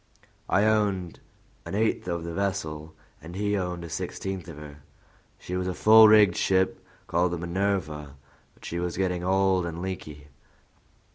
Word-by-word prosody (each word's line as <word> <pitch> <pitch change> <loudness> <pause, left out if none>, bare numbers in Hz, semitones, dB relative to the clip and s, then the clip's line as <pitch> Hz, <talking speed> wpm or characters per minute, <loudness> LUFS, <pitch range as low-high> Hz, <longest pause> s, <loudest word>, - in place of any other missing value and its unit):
I 100 - +3
owned 100 -5 0 0.4
an - - -6
eighth 110 -3 0
of 85 -2 -2
the 85 0 -5
vessel, 80 -5 -3 0.3
and 85 +3 -10
he 105 +1 0
owned 90 -3 -3
a 85 - -8
sixteenth 95 +2 -5
of 85 -4 -9
her. 75 -1 -10 0.6
She 90 - -6
was 90 0 -2
a 90 - -3
full 110 0 +8
rigged 105 -4 +6
ship, 95 0 +1 0.2
called 90 +1 +1
the - - -2
Minerva, 85 -5 -2 0.4
but - - -16
she 85 - -4
was 85 0 -3
getting 90 -2 -1
old 95 0 +2
and 85 -1 -5
leaky. 75 -5 -7
90 Hz, 160 wpm, -26 LUFS, 85-95 Hz, 0.6 s, full